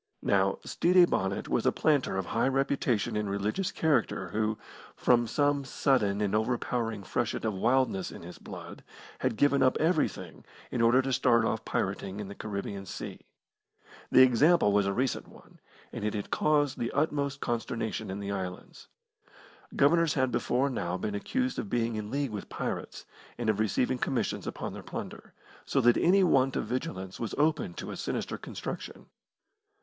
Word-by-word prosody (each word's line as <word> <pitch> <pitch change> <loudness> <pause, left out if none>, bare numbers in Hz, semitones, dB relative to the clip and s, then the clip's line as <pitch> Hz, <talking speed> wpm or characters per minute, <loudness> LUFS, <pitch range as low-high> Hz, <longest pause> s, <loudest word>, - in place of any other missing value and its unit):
Now, 100 -1 +2
Stede 180 0 +4
Bonnet 95 +1 -1
was - - +1
a - - +5
planter 145 -10 +1
of 95 - -1
high 115 +7 0
reputation 130 -5 0
and 105 -1 -1
religious 105 - -1
character 150 -8 0
who, 110 0 -1 0.4
from 120 -1 +3
some 145 +2 +1
sudden 105 -7 +1
and 100 -1 0
overpowering 115 -1 -1
freshet - - -2
of 110 - 0
wildness 115 -1 +1
in - - -10
his 90 +1 -10
blood, - - -9 0.4
had 110 - -1
given 140 -1 +3
up 130 -1 +4
everything 160 -1 0 0.3
in 120 - -1
order 120 +3 +5
to 135 0 -1
start 115 -2 +3
off 110 0 -1
pirating 95 0 -2
in 100 -2 -5
the - - -6
Caribbean 100 -2 -5
Sea. - - -6 0.9
The 130 - +8
example 130 0 +5
was 100 -1 +3
a - - +1
recent 125 +5 -1
one, - - -18 0.3
and - - -5
it 105 0 -1
had 105 - -4
caused 145 -3 +2
the 115 - -1
utmost 140 -1 0
consternation 115 -3 -3
in 95 +1 -4
the 100 0 -4
islands. 95 -2 -6 0.9
Governors 165 +3 +4
had 130 -3 +1
before 125 +3 +1
now 90 -7 -2
been 105 +3 -3
accused 255 - -1
of 205 - -4
being 115 -6 0
in 105 -1 -4
league 140 -1 -1
with 105 -2 -6
pirates, - - -5 0.3
and 115 -2 +1
of 105 - -4
receiving 125 +4 +1
commissions 130 - -1
upon - - -4
their - - -7
plunder, - - -8 0.3
so - - 0
that 120 0 +5
any 190 +3 +4
want 135 -6 +3
of - - -1
vigilance 110 - -4
was 115 - -3
open 145 - +1
to - - -6
a - - -5
sinister - - -3
construction. - - -7
120 Hz, 170 wpm, -29 LUFS, 105-140 Hz, 0.9 s, The